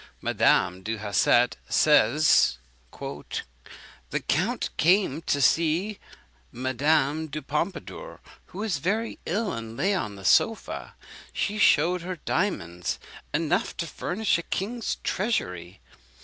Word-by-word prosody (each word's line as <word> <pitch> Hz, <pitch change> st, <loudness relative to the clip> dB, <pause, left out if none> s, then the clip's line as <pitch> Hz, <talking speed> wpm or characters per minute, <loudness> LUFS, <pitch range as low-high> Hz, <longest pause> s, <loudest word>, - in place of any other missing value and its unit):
Madame 90 Hz, +1 st, +2 dB
du 110 Hz, +3 st, -3 dB
Hausset 110 Hz, +4 st, +2 dB
says: 150 Hz, -, +4 dB, 0.4 s
"The -, -, -7 dB
count -, -, -1 dB
came 175 Hz, -3 st, +3 dB
to 145 Hz, -, +2 dB
see 165 Hz, +8 st, +2 dB, 0.5 s
Madame 145 Hz, +4 st, +1 dB
du 155 Hz, +1 st, -5 dB
Pompadour, 175 Hz, -, -4 dB, 0.3 s
who 185 Hz, -, -12 dB
was 205 Hz, -8 st, -1 dB
very 215 Hz, +9 st, -1 dB
ill, 205 Hz, +3 st, -1 dB
and 115 Hz, -1 st, -7 dB
lay 200 Hz, +2 st, +2 dB
on 110 Hz, -, -2 dB
the 95 Hz, -1 st, -11 dB
sofa. 225 Hz, -, +1 dB, 0.4 s
He 210 Hz, +1 st, -2 dB
shewed 180 Hz, -1 st, +4 dB
her 180 Hz, +2 st, -4 dB
diamonds 90 Hz, -, -2 dB, 0.3 s
enough 155 Hz, +1 st, 0 dB
to 170 Hz, -, -2 dB
furnish 180 Hz, +5 st, -1 dB
a -, -, -3 dB
king's 220 Hz, +7 st, -3 dB
treasury. 90 Hz, -, -2 dB
155 Hz, 115 wpm, -26 LUFS, 120-190 Hz, 0.5 s, says